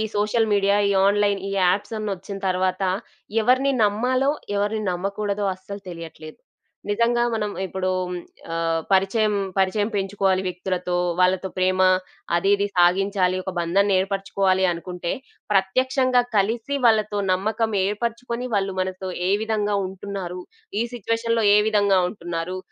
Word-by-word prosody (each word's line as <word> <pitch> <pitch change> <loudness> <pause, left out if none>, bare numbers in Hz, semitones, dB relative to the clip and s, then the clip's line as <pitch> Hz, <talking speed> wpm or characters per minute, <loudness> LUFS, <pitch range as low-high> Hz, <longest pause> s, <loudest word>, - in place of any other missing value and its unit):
Social 215 +2 +1
media, 200 0 +3
ఈ - - +2 0.2
online 205 -1 +2
ఈ - - -3
యాప్సన్నొచ్చిన 200 +1 -1
తర్వాతా, 185 +1 0 0.5
ఎవరిని 260 +4 +3
నమ్మాలో 250 +6 +1 0.3
ఎవరిని 210 +2 0
నమ్మకూడదో 200 +3 -2
అస్సలు 195 +2 -9
తెలియట్లేదు. 165 -2 -9 0.5
నిజంగా 235 +3 +2
మనం 210 -2 -1
ఇప్పుడూ 185 0 -2 0.6
ఆహ్, 165 0 0
పరిచయం 205 +2 +2 0.2
పరిచయం 205 +3 +1
పెంచుకోవాలి 195 -1 +1
వ్యక్తులతో, 180 0 -2 0.2
వాళ్ళతో 185 +1 +2
ప్రేమా 185 0 +3 0.5
అది 195 +3 +1
ఇది 200 0 -1
సాగించాలి, 185 +1 +3
ఒక 190 - -4
బంధాన్ని 195 +4 +2
ఏర్పరుచుకోవాలి 195 -1 +1
అనుకుంటే, 175 0 -4 0.4
ప్రత్యక్షంగా 255 +6 +2 0.2
కలిసి 230 +7 0
వాళ్ళతో 215 -2 +3
నమ్మకం 220 +4 0
ఏర్పరుచుకొని, 235 +4 -3
వాళ్ళు 195 -1 0
మనతో 185 0 -3 0.2
ఏ 190 - +2
విధంగా 210 -2 0
ఉంటున్నారు, 190 -1 -6 0.4
ఈ - - +2
సిట్యుయేషన్‌లో 230 0 0
ఏ - - +7
విధంగా 205 -3 +3
ఉంటున్నారు, 175 -1 -4
200 Hz, 120 wpm, -23 LUFS, 185-215 Hz, 0.6 s, ఏ